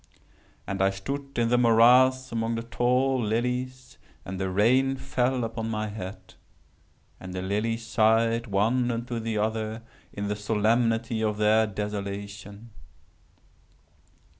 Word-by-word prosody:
And 100 -1 -3
I 95 - +4
stood 140 +8 -6
in 115 -1 +2
the 125 0 +3
morass 125 +2 +5
among 115 0 -1
the 115 - -4
tall 125 0 +1
and 125 -5 -4
the 95 -1 -1
rain 125 +8 +3
fell 130 -1 -1
upon 115 0 -4
my 110 -1 -2
head—and 95 -2 -12
the 90 - -3
lilies 110 +4 -2
sighed 115 +1 +2
one 115 +5 +1
unto 120 0 -3
the 110 -1 -3
other 110 +1 -2 0.3
in 100 0 -4
the 105 - -1
solemnity 115 +2 0
of 105 -1 0
their 110 +1 +3
desolation. 100 +1 -6
115 Hz, 120 wpm, -26 LUFS, 105-120 Hz, 0.3 s, morass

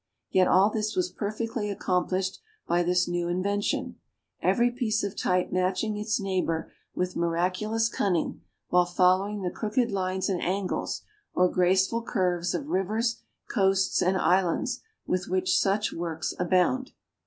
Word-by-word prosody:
Yet 185 -1 +4
all 195 +3 +5
this 215 -1 -2
was 180 0 0
perfectly 215 +2 -3
accomplished 185 -1 -1 0.3
by 175 +1 +2
this 180 +1 +2
new 175 0 -1
invention 200 +3 -1 0.4
every 240 0 +3
piece 230 -3 -1
of 200 - -3
type 180 0 0
matching 185 +4 0
its 210 +1 -1
neighbor 185 -5 -1 0.2
with 180 0 -2
miraculous 185 +7 0
cunning, 190 -7 -1 0.3
while 180 0 +4
following 185 +3 +2
the 180 - -1
crooked 235 +2 0
lines 190 -1 -1
and 185 -4 -1
angles, 190 +1 -2 0.3
or 180 0 +4
graceful 190 +6 +2
curves 180 -6 0
of 290 - -4
rivers, 220 +5 0 0.3
coasts, 195 -1 +2
and 185 +1 +2
islands, 190 +8 +1 0.2
with 185 -1 -1
which 185 0 +1
such 205 +2 +1
works 165 -2 -3
abound. 185 +9 +1
190 Hz, 140 wpm, -27 LUFS, 180-210 Hz, 0.4 s, all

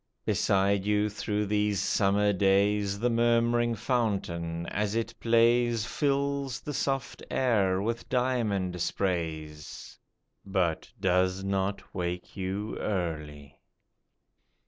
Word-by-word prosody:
Beside 100 0 +2
you 105 +1 +1
through 105 0 -2
these 105 -1 +1
summer 100 +1 +2
days 100 +1 +2
The 120 +4 +1
murmuring 120 0 +2
fountain, 90 -8 -1
as 105 +3 -2
it 115 0 -1
plays, 115 -1 +3
Fills 140 -1 -1
the 150 - -6
soft 135 -1 -2
air 100 -7 +2
with 115 +2 -3
diamond 110 -9 0
sprays, 80 -6 -3 0.4
But 95 -5 -1
does 95 0 +1
not 95 0 -2
wake 90 -1 -4
you 100 +2 -3
early 75 -7 -4
100 Hz, 100 wpm, -28 LUFS, 95-115 Hz, 0.4 s, plays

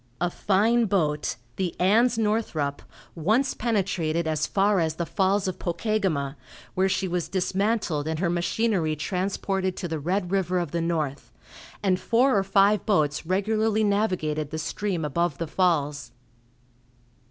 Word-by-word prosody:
A 175 +1 0
fine 220 +6 +2
boat, 155 -7 0 0.2
the 185 -3 -3
"Ans. 225 +6 +3
Northrup," 210 -10 -1 0.3
once 220 - +1
penetrated 185 -7 -1
as 155 -1 0
far 200 0 +2
as 160 -2 0
the 170 - -2
Falls 195 +2 +1
of 185 - -4
Pokegama, 170 -7 -1 0.4
where 190 +1 +2
she 190 - 0
was 175 -1 -2
dismantled 190 -4 0
and 160 0 -1
her 175 +2 0
machinery 175 -2 0
transported 190 +3 -2
to 175 - -3
the 160 -2 -3
Red 180 +4 -1
River 185 -2 +1
of 170 -5 -2
the 170 - -1
North, 155 -5 -2 0.5
and 185 -2 +2
four 250 +5 +3
or 195 - +3
five 195 +1 +3
boats 155 -7 +1
regularly 215 +3 +1
navigated 185 -8 0
the 155 - -4
stream 165 +2 -2
above 170 +4 -1
the 165 - -2
falls. 150 -6 0
185 Hz, 145 wpm, -25 LUFS, 160-205 Hz, 0.5 s, Ans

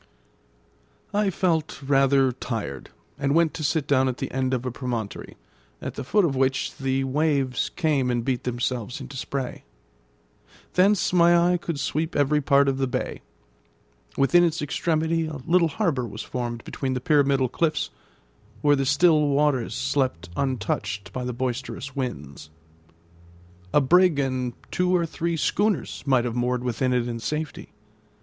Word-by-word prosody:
I 205 -1 +2
felt 165 -4 0
rather 135 -1 +3
tired, 115 - -5 0.3
and 140 +2 +1
went 165 -2 +3
to 155 - -5
sit 155 0 +1
down 130 -2 +3
at 130 -1 -2
the - - -4
end 130 0 -1
of 130 -1 -1
a 125 - -2
promontory, 120 -4 -5 0.4
at - - -5
the 140 - -5
foot 200 +9 +3
of 140 -5 0
which 130 0 0
the 135 0 0
waves 135 -2 0
came 150 -7 0
and 120 -1 -1
beat 130 -2 -1
themselves 120 -1 -2
into 135 - -9
spray. 130 0 -4 1.1
Thence 190 0 +3
my 175 -1 +6 0.2
eye - - +2
could 170 -4 -4
sweep 155 +4 -2
every 150 +1 +2
part 140 0 +4
of 135 -1 0
the 135 - +1
bay; 125 - -3 1.0
within 175 +6 +5
its 165 -1 +1
extremity 160 +2 0
a 155 -1 -5
little 170 0 +4
harbour 150 - -1
was 105 0 -7
formed 120 -2 -4
between 130 -2 -3
the - - -1
pyramidal 140 -1 +3
cliffs, 155 +4 -1 0.7
where 145 0 +5
the 135 -1 -1
still 150 +1 +4
waters 140 -5 +1
slept 130 - -1
untouched 100 -7 -2
by 130 - -3
the 125 - -2
boisterous 130 +2 -4
winds. 75 - -5 1.2
A 150 - +4
brig 175 +3 +4
and 130 -3 -1 0.2
two 180 0 +2
or 170 -1 +2
three 165 +1 -2
schooners 205 - 0
might 130 -3 +3
have 120 -1 -3
moored 125 0 0
within 125 +1 0
it 125 -1 +1
in 115 -1 -4
safety. 150 +5 -4
135 Hz, 155 wpm, -25 LUFS, 125-155 Hz, 1.2 s, my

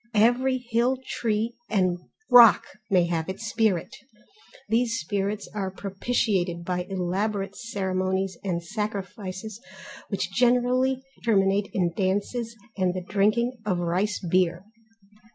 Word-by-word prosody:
Every 245 +4 +3
hill 245 +1 0
tree 225 +1 -1 0.2
and 185 -4 +1 0.3
rock 240 -3 +9 0.3
may 180 -3 +4
have 165 -1 -2
its 195 +5 -5
spirit. 215 -6 0 0.7
These 230 0 +1
spirits 200 +5 -2
are 195 -3 -2
propitiated 195 -3 -1
by 180 0 -2
elaborate 195 +2 -2
ceremonies 190 -3 -2
and 175 -3 -2
sacrifices 205 +1 -5 0.5
which - - -2
generally 250 +2 +2 0.2
terminate 200 -2 +2
in 175 -3 0
dances, 205 +5 -1 0.2
and 185 -2 0
the 185 - -3
drinking 215 +5 +1
of 195 -4 0
rice 180 +4 0
beer. 180 0 +2
200 Hz, 115 wpm, -26 LUFS, 185-230 Hz, 0.7 s, rock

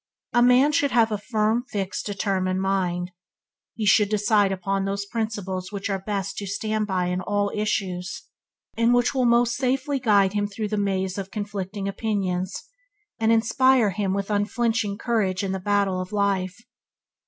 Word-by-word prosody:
A 240 - +4
man 250 +4 +5
should 285 -1 +2
have 230 -2 +3
a 210 - -1
firm, 220 +1 0
fixed, 195 -3 -3
determined 190 -2 -1
mind. 185 -2 -1 0.6
He 220 - -2
should 205 0 +4
decide 210 -1 +2
upon 195 +1 -1
those 200 +1 -2
principles 200 -4 -4
which 200 0 -3
are 195 - -1
best 195 0 -3
to 200 - -4
stand 215 +2 -2
by 185 -2 0
in 180 +1 -1
all 205 +1 0
issues, 195 -2 -2 0.5
and 230 +1 +3
which 245 +2 +2
will 260 -2 +1
most 235 0 +3
safely 265 +2 0
guide 205 -5 +3
him 205 -1 0
through 210 +1 -4
the 215 - -1
maze 190 -2 -1
of 195 -1 -5
conflicting 200 -1 -4
opinions, 195 -3 -2 0.6
and 225 0 +3
inspire 235 0 +3
him 195 -1 -1
with 200 +1 -3
unflinching 210 0 0
courage 205 -6 0
in 195 - -1
the 190 - -2
battle 195 -1 +1
of 185 - -7
life. 200 -1 0
205 Hz, 165 wpm, -24 LUFS, 195-225 Hz, 0.6 s, man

